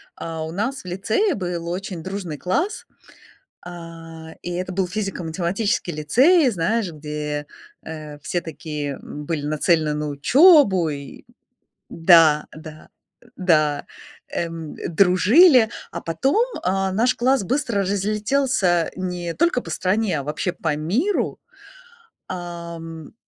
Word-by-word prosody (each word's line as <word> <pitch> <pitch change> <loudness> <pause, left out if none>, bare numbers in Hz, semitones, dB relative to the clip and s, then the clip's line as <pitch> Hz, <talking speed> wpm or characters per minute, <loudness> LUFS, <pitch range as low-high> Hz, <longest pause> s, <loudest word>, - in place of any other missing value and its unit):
а, 165 -1 -5
у 160 - -6
нас 230 +9 -3
в - - -30
лицее 215 - 0
был 175 -3 -4
очень 180 -2 -5
дружный 185 -5 -5
класс, 335 - -2 0.8
а, 165 -2 -10
и 175 - -5
это 180 +1 -3
был 190 0 0
физико-математический 185 0 -2
лицей, 260 - +4
знаешь, 200 +2 -1
где, 150 -1 -5 0.4
э, 155 -2 -8
все 165 +4 -2
такие, 150 -3 -5
м, 150 0 -8
были 155 -3 -2
нацелены 155 0 +1
на 150 0 -3
учебу, 200 - +5
и 140 -2 -8 0.6
да, 165 -3 +5
да. 155 0 -11 0.5
Да. 155 -6 +2 0.5
Эм, 165 -2 -4 0.2
дружили, 220 - +6 0.2
а - - -4
потом, 165 - 0 0.2
э, 195 +1 0
наш 235 +6 +2
класс 260 +1 +2
быстро 235 -3 0
разлетелся 205 -2 +1
не 180 -2 -4
только 340 -6 +2
по - - -9
стране, 185 -4 0
а - - -4
вообще 150 +5 -2
по 160 -3 -2
миру. 225 - -1 0.9
Ам. 170 -3 -7
175 Hz, 120 wpm, -22 LUFS, 160-210 Hz, 0.9 s, дружили